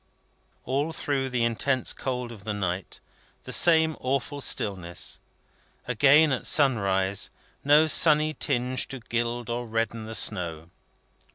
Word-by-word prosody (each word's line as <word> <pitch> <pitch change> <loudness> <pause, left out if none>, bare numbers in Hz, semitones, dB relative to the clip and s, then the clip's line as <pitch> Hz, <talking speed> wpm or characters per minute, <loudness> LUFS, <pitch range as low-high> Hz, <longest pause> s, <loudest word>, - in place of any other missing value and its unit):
All 145 +5 -2
through 135 -4 -2
the 125 -2 -1
intense 125 +3 -1
cold 125 -2 -5
of 105 -4 -12
the 110 -1 -4
night, 95 -2 -4 0.4
the - - -9
same 160 -2 +4
awful 140 +2 -3
stillness. 90 -8 -2 0.7
Again 140 +5 +4
at 130 - -1
sunrise, 100 -8 +1 0.3
no 150 +2 +5
sunny 155 0 +4
tinge 130 -3 -2
to 135 - -7
gild 120 0 -3
or 120 0 -4
redden 115 0 -3
the 110 - -3
snow. 85 -6 +1
120 Hz, 125 wpm, -25 LUFS, 110-140 Hz, 0.7 s, no